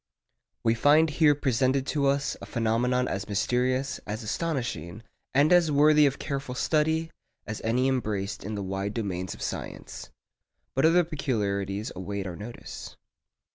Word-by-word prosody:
We 115 - +3
find 150 +6 +4
here 150 -1 +4
presented 130 -1 +1
to 145 -2 +2
us 140 +1 +1
a - - -8
phenomenon 120 +2 +1
as 100 +2 -4
mysterious, 130 +6 0
as 110 +3 -4
astonishing, 115 - -3 0.3
and 145 +5 +5
as 175 -3 +5
worthy 150 +1 +6
of 140 - -2
careful 140 -3 -4
study 160 +3 +1 0.3
as 105 - -5
any 125 +4 +2
embraced 105 -7 -2
in 105 +2 -4
the 100 - -3
wide 95 +2 -3
domains 95 -5 -3
of - - -8
science. - - -6 0.6
But 135 +4 +4
other 175 +2 +5
peculiarities 105 - -2
await 100 +2 -4
our 90 -2 -5
notice. 110 +6 -9
125 Hz, 145 wpm, -27 LUFS, 105-145 Hz, 0.6 s, worthy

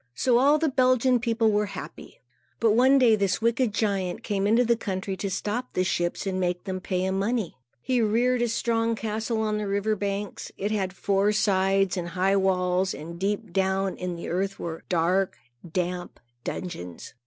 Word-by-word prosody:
So 245 - +3
all 285 +4 +5
the 320 +1 +1
Belgian 255 -2 +3
people 230 -2 +1
were 210 0 +1
happy. - - -10 0.4
But 225 -2 +4
one 260 +5 +5
day, 240 -4 +5
this 200 -3 0
wicked 235 +1 +1
giant 200 -2 -1
came 200 -3 0
into 230 +4 +4
the 235 0 +3
country 195 -2 -3
to 200 - -3
stop 210 +6 -3
the 185 - +1
ships 175 0 -1
and 190 -1 -1
make 180 -1 -1
them 190 -1 -4
pay 185 -1 -1
him 190 0 0
money. 215 -2 -1 0.3
He 255 -2 +1
reared 240 +3 +2
a 240 - +2
strong 230 0 0
castle 220 +1 -2
on 215 -1 0
the 210 - -3
river 200 +2 0
banks. 200 0 -4
It 205 +2 -2
had 195 -3 -1
four 195 +2 +1
sides 195 -2 +2
and 175 -1 -3
high 185 +3 +1
walls, 185 -1 +1
and 170 +2 -8
deep 205 0 -2
down 190 0 +1
in 180 -1 -4
the 170 - -6
earth 195 +3 -1
were 165 -1 -5
dark, 180 +2 +1 0.3
damp 180 0 -3 0.2
dungeons. 90 - -6
200 Hz, 185 wpm, -26 LUFS, 185-225 Hz, 0.4 s, all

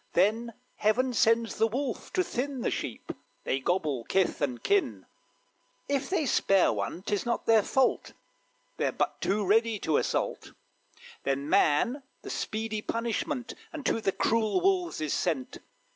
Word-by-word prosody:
Then 220 +6 +2 0.2
Heaven 245 +4 +2
sends 230 0 +2
the 225 - +4
wolf 250 +1 -3
to 370 - +2
thin 270 -3 -3
The - - 0
sheep - - -4 0.3
they 135 - 0
gobble 150 -5 0
kith 190 -4 +1
and 130 -4 -2
kin 405 -1 +1 0.8
If 275 -1 -1
they 365 -5 +1
spare 195 - +3
one 105 - -4
'tis 205 -1 -1
not 240 0 -2
their 225 -1 +5
fault, 260 +5 +1 0.6
They're - - +1
but - - -2
too 205 +1 +1
ready 225 +3 +3
to 155 -2 +2
assault; - - -2 0.7
Then 140 +1 -1
man 230 - +3 0.2
the - - -6
speedy 215 0 -3
punishment 235 +3 -2 0.2
Unto 285 -7 -1
the 195 - +1
cruel 220 - +1
wolves 365 - +1
is 155 -2 -1
sent. 145 -8 -2
225 Hz, 145 wpm, -29 LUFS, 185-250 Hz, 0.8 s, their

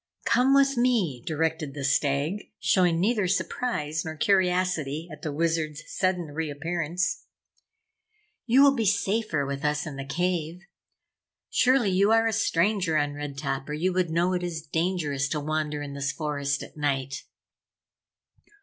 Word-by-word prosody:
"Come 260 +2 +4
with 275 -1 +4
me!" 220 - +1
directed 160 -2 -1
the 140 - -5
Stag, 140 +7 0
showing 175 -3 +3
neither 205 0 +1
surprise 175 -4 -1
nor 160 0 -5
curiosity 180 -4 +1
at 150 -1 -10
the 155 - -3
Wizard's 155 -1 -1
sudden 180 -5 -1
reappearance. 165 - -2 1.2
"You 255 +4 +6
will 280 -1 +6
be 230 -5 0
safer 200 -6 0
with 140 +1 -4
us 150 +1 0
in 150 -4 -6
the 135 - -4
cave. 175 +2 -2 0.9
Surely 250 -5 +3
you 195 +3 +3
are 225 0 +4
a 225 - +1
stranger 185 -4 +1
on 145 -1 0
Red 145 -1 -6
Top 135 -1 -3
or - - -3
you 175 +5 0
would 180 -2 +1
know 170 +3 +1
it 180 - -1
is 170 -3 -4
dangerous 160 -4 -1
to 150 - -1
wander 150 0 -2
in 140 -1 -7
this 140 0 -2
forest 140 -2 -2
at - - -12
night." 135 -2 -2
160 Hz, 150 wpm, -26 LUFS, 145-185 Hz, 1.2 s, You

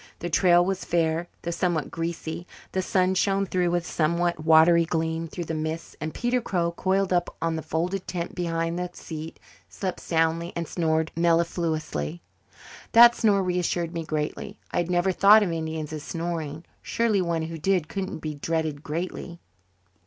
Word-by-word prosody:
The 175 - -5
trail 175 +1 +5
was 190 0 -2
fair, 165 0 0 0.2
though 170 - -2
somewhat 170 -2 -1
greasy; 165 0 -4 0.2
the 190 - 0
sun 185 0 +2
shone, 195 +1 +1
though 180 -1 +2
with 175 0 0
a - - -9
somewhat 170 0 0
watery 160 +1 +6
gleam, 160 0 -1
through 175 +2 -5
the 160 - -4
mists; 155 +1 -4
and 155 +1 -3
Peter 245 +5 0
Crow, 175 -6 0
coiled 190 +2 0
up 175 -1 0
on 165 -1 0
the 160 - -3
folded 180 +5 -2
tent 175 -1 -4
behind 165 -1 -2
the 180 0 -3
seat, 160 -1 -8 0.3
slept 185 -2 -4
soundly 165 +1 0
and 170 -1 -3
snored 160 -1 0
mellifluously. 165 - 0 0.7
That 235 +1 +9
snore 205 -5 +2
reassured 175 -2 -1
me 165 -1 -3
greatly. 155 +7 -4
I - - -2
had 175 0 0
never 180 +1 +2
thought 205 +4 +7
of 185 - -1
Indians 160 -1 -4
as 155 - -4
snoring. 165 -2 -4 0.2
Surely 225 -4 +1
one 170 -2 -1
who 165 0 -5
did 180 -1 +1
couldn't 190 -3 -4
be 155 -1 -3
dreaded 155 0 -2
greatly. 170 +2 -5
170 Hz, 170 wpm, -26 LUFS, 160-180 Hz, 0.7 s, That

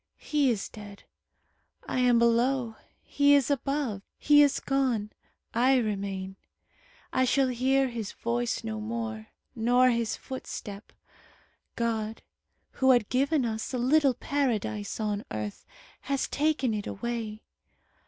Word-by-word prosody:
He 290 -3 +1
is 215 -5 -1
dead. 205 -2 -11 0.8
I - - -2
am 250 -1 +4
below. 235 0 +2 0.3
He 285 0 +4
is 280 0 +2
above. 275 -6 -1 0.2
He 295 0 +5
is 285 -2 +3
gone. 255 -6 0 0.4
I 255 +3 +4
remain. 195 -4 -3 0.8
I 260 - +3
shall 265 +1 +2
hear 265 +2 +2
his 230 -4 -5
voice 235 0 -2
no 220 -1 -4
more, 220 0 -4 0.3
nor 245 +2 +4
his 230 -2 -1
footstep. 210 -6 -8 0.8
God, 225 -2 -2 0.5
who 265 - +1
had 240 -5 +4
given 275 +1 +2
us 220 +3 -3
a - - 0
little 265 +2 +3
Paradise 225 -8 -2
on 210 -1 -1
earth, 105 -1 -5 0.3
has 275 0 -2
taken 285 -5 0
it 210 -1 -3
away. 225 -1 -4
235 Hz, 125 wpm, -28 LUFS, 215-265 Hz, 0.8 s, He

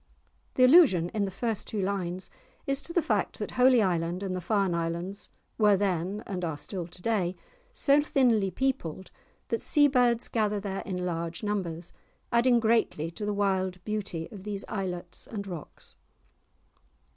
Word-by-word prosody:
_" - - -39
The 255 - +4
allusion 255 - +6
in 210 0 -1
the - - -3
first 220 +2 -3
two 215 - -2
lines 185 -2 -2 0.3
is 275 0 0
to - - -6
the 340 -1 +1
fact - - 0
that - - -4
Holy 250 -2 +5
Island 175 0 -1
and 185 -2 -2
the 180 - -3
Farne 195 0 +1
Islands 170 +3 -3 0.3
were 210 -2 +5
then, 190 +1 -1
and 185 -2 -4
are 160 -3 -2
still 175 +2 -5
to 180 - -16
day, 190 -6 0 0.4
so 290 - +4
thinly 240 -9 +2
peopled 190 - -2 0.4
that 230 - -1
sea 290 -1 +5
birds 245 -3 +2
gather 210 -2 0
there 195 -1 -4
in 180 -2 -3
large 170 +1 -3
numbers, 180 -5 -3 0.4
adding 240 0 +4
greatly 220 -8 +1
to 205 +5 -5
the - - +1
wild 190 -2 0
beauties 205 -6 -3
of 200 -3 -10
these 205 -1 -4
islets 180 -2 -4
and 205 -3 -5
rocks. 175 -6 -9
195 Hz, 170 wpm, -28 LUFS, 180-225 Hz, 0.4 s, allusion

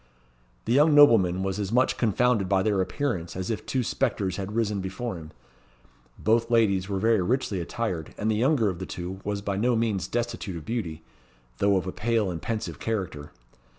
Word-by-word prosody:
The - - +1
young 150 +3 +5
nobleman 95 -11 +6
was 95 +1 -2
as 100 -1 -3
much 125 +2 +3
confounded 115 -3 +1
by 95 -1 +3
their 100 -2 +2
appearance 95 - -2
as 95 +3 -3
if 110 - -3
two 130 -1 0
spectres 105 -7 -1
had 100 +1 -5
risen 105 -3 0
before 100 +4 -4
him. 80 -2 -9 0.9
Both 115 +1 +1
ladies 100 -5 +2
were 100 - -1
very 110 +1 +3
richly 110 -1 0
attired, 90 -3 -4
and 110 +1 0
the - - +1
younger 125 0 +2
of 90 -3 -2
the 95 - -5
two 90 +2 -6
was 100 0 -3
by 100 -1 -2
no 120 +4 +2
means 110 -5 0
destitute 120 -5 -3
of 80 - -9
beauty, 85 -9 -4 0.6
though 100 -1 +3
of 90 - -2
a 95 - -3
pale 110 -3 0
and 85 -2 -5
pensive 115 -1 -4
character. 90 -10 -4
105 Hz, 190 wpm, -26 LUFS, 95-115 Hz, 0.9 s, nobleman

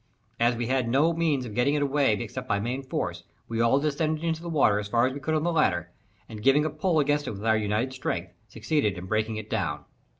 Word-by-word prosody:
As 120 +1 +3
we 120 +1 -2
had 130 -1 0
no 150 +7 +3
means 155 -6 0
of 110 - -7
getting 125 +6 +2
it 145 - +1
away 140 -4 +2
except 105 - -5
by 100 - +1
main 125 +6 -2
force, 130 - -4 0.2
we 115 0 -1
all 115 +4 +4
descended 155 +2 -1
into 165 -1 -1
the 170 - -6
water 135 -10 +3
as 105 - -4
far 115 +3 +2
as 130 - -1
we 140 - -6
could 155 +2 -1
on 155 - 0
the 175 - +1
ladder, 85 - +1 0.4
and 110 -2 -9
giving 135 +5 +4
a 155 - -1
pull 160 +2 +1
against 145 -1 +1
it - - -2
with 100 +2 -7
our 110 -1 +4
united 110 +4 -1
strength, 95 -9 -3
succeeded 110 -1 -1
in 90 - -7
breaking 110 +2 -1
it 110 -1 -6
down. 90 -10 -2
130 Hz, 245 wpm, -27 LUFS, 110-150 Hz, 0.4 s, all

